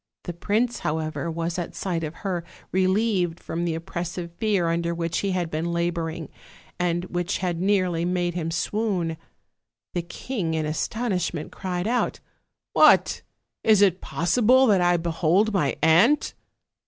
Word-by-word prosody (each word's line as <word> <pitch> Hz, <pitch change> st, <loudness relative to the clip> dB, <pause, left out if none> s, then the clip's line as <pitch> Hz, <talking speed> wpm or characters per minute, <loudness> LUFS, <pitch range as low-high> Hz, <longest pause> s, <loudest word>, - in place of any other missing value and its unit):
The 175 Hz, -, -5 dB
prince, 220 Hz, +8 st, 0 dB
however, 155 Hz, +2 st, -2 dB
was 165 Hz, +2 st, -2 dB
at 175 Hz, -, -5 dB
sight 175 Hz, -4 st, -2 dB
of 155 Hz, +1 st, -5 dB
her 180 Hz, -3 st, -1 dB, 0.3 s
relieved 185 Hz, -2 st, +1 dB
from 170 Hz, +1 st, -3 dB
the 165 Hz, -2 st, -1 dB
oppressive 170 Hz, +1 st, -5 dB
fear 205 Hz, -6 st, +1 dB
under 170 Hz, 0 st, 0 dB
which 165 Hz, 0 st, -1 dB
he 200 Hz, -, -1 dB
had 180 Hz, -3 st, -1 dB
been 160 Hz, +2 st, -2 dB
labor 170 Hz, -1 st, -1 dB
ing, 160 Hz, -2 st, -7 dB, 0.5 s
and 175 Hz, 0 st, 0 dB
which 175 Hz, +1 st, -2 dB
had 175 Hz, -2 st, -2 dB
nearly 185 Hz, -4 st, +1 dB
made 175 Hz, 0 st, 0 dB
him 165 Hz, -2 st, -2 dB
swoon. 180 Hz, -1 st, -1 dB, 0.8 s
The 175 Hz, -, 0 dB
king, 170 Hz, 0 st, -4 dB
in 155 Hz, -1 st, -1 dB
astonishment, 180 Hz, 0 st, -2 dB
cried 180 Hz, -1 st, -3 dB
out: 245 Hz, +2 st, 0 dB, 0.5 s
"What! -, -, +5 dB, 0.4 s
is 215 Hz, -2 st, +5 dB
it 190 Hz, -2 st, +3 dB
possible 245 Hz, +9 st, +3 dB
that 200 Hz, -6 st, +4 dB
I 175 Hz, 0 st, +4 dB
behold 170 Hz, +5 st, +1 dB
my 150 Hz, -8 st, +1 dB
aunt?" 190 Hz, -, +4 dB
175 Hz, 150 wpm, -25 LUFS, 165-195 Hz, 0.8 s, What